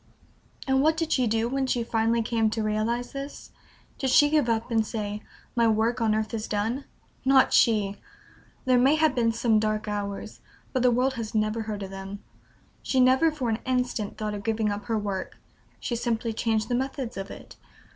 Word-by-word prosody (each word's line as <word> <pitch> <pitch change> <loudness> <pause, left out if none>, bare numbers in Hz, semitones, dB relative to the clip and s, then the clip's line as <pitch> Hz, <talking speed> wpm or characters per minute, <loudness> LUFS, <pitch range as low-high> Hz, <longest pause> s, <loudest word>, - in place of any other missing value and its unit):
And 265 0 +3
what 315 +2 +3
did 325 -1 -1
she 255 -2 +2
do 225 +1 +1
when 265 +1 -1
she 245 -2 0
finally 230 0 +1
came 225 -1 +1
to 220 0 -2
realize 220 +3 -1
this? 275 +1 -7 0.5
Did 265 - 0
she 290 +2 +5
give 295 -6 +3
up, 230 +1 -1
and 225 -1 +3
say, 210 -1 -4 0.3
"My 235 -1 +4
work 225 +2 +1
on 220 -1 +2
earth 215 +1 -2
is 220 -1 -3
done?" 225 +6 -2 0.4
Not 265 0 +5
she! 205 -4 +3 0.7
There 255 -1 +4
may 270 +5 +5
have 315 -2 +3
been 235 -3 +2
some 225 -1 +2
dark 215 0 -1
hours, 200 -1 -4 0.3
but 255 - +1
the 250 - +5
world 250 +2 +2
has 225 -3 -5
never 215 +1 +1
heard 210 -2 -4
of 190 - -7
them. 195 +1 -7 0.6
She 265 - 0
never 260 +5 +5
for 285 -5 -3
an 220 0 0
instant 250 -4 -1
thought 215 -1 -3
of 205 - -5
giving 220 -1 0
up 205 0 -5
her 225 0 0
work; 200 -3 -4 0.4
she 240 - -3
simply 230 -1 -1
changed 220 -1 0
the 245 - -2
methods 260 -1 -2
of 195 0 -5
it. - - -11
230 Hz, 195 wpm, -26 LUFS, 215-255 Hz, 0.7 s, she